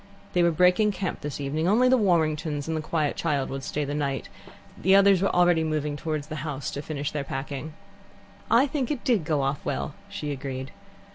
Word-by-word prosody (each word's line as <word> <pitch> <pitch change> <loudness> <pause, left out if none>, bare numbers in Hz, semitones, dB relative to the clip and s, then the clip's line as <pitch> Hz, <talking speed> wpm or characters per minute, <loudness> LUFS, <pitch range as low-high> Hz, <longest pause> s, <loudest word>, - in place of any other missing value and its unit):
They 180 - +3
were 170 - +5
breaking 180 +5 +3
camp 190 -2 -3
this 145 -1 -5
evening: 150 +4 -1
only 230 +6 +4
the 255 - +5
Warringtons 155 - +1
and 160 -1 -1
quiet 155 -2 -1
child 145 -5 -1
would 135 0 -4
stay 150 +2 -2
the 145 - -3
night, 140 -2 -2 0.5
and - - -15
the 190 +2 +6
others 195 -2 +6
were 195 - +2
already 175 -2 +3
moving 150 -2 -1
towards 155 -1 -3
the 155 0 -6
house 145 -2 -4
to 140 - -4
finish 145 0 -4
their 150 -2 -2
packing. 140 +3 -5 0.8
"I 235 +4 +5
think 270 -3 -2
it 285 -5 -3
did 235 - +2
go 150 -3 +1
off 135 +1 -1
well," - - -3 0.2
she 175 -8 -4
agreed. 135 -1 -5
155 Hz, 205 wpm, -26 LUFS, 145-180 Hz, 0.8 s, the